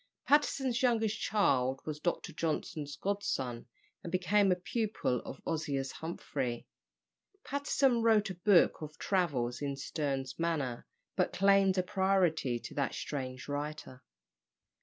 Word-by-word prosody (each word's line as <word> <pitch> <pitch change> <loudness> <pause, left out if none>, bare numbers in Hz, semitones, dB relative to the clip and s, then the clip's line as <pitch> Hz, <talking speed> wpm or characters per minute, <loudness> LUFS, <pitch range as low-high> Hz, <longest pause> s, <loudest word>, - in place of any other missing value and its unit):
Patterson's 270 -4 +2
youngest 225 -4 +2
child 135 -11 +2
was 150 -1 -4
Dr. 175 +2 -2
Johnson's 155 -2 -3
godson, 135 -11 -2 0.3
and 170 - -7
became 190 +2 +3
a - - +4
pupil 190 - -1
of 130 - -8
Ozias 140 -5 -2
Humphrey. 135 -7 -4 0.8
Patterson 275 -3 +1
wrote 220 -3 +3
a - - -4
book 180 -1 +4
of 155 -1 -7
travels 145 -11 0
in 140 -1 -2
Sterne's 135 -1 -3
manner, 150 -8 -1 0.3
but - - +1
claimed 195 0 +4
a 185 - +3
priority 180 -9 +1
to - - -8
that 140 -2 -1
strange 130 -3 -5
writer. 145 -2 -5
165 Hz, 125 wpm, -32 LUFS, 135-200 Hz, 0.8 s, a